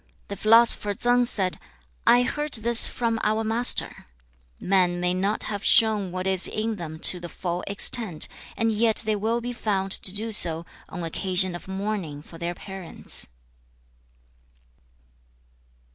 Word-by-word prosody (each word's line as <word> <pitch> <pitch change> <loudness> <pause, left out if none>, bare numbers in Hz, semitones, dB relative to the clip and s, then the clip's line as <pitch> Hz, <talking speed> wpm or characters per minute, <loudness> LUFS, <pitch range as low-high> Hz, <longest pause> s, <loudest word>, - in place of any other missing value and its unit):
The 200 - -5
philosopher 215 -1 +3
Tsang 245 +3 +2
said, 190 -6 -3 0.5
'I 240 +1 +6
heard 295 +3 -4
this 230 +1 +2
from 230 -2 -2
our 215 +1 0
Master: 225 - 0 0.5
"Men 180 -2 +1
may 180 0 0
not 195 +4 -1
have 205 -1 -5
shown 215 -4 +3
what 185 +1 -5
is 190 -1 +5
in 220 0 -3
them 160 -3 -7
to 180 - +6
the 175 0 -8
full 175 +1 -5
extent, 200 -3 0 0.3
and 225 -1 +1
yet 220 +1 +1
they 215 -1 0
will 225 +3 -1
be 245 +1 -5
found 195 -5 -2
to 190 - +2
do 220 +3 -4
so, 170 -5 +3 0.2
on 175 - -7
occasion 185 +2 +3
of 175 - -9
mourning 190 -7 -5
for 165 - -14
their 170 +1 -4
parents."' 190 -3 -4
200 Hz, 145 wpm, -24 LUFS, 180-225 Hz, 0.5 s, I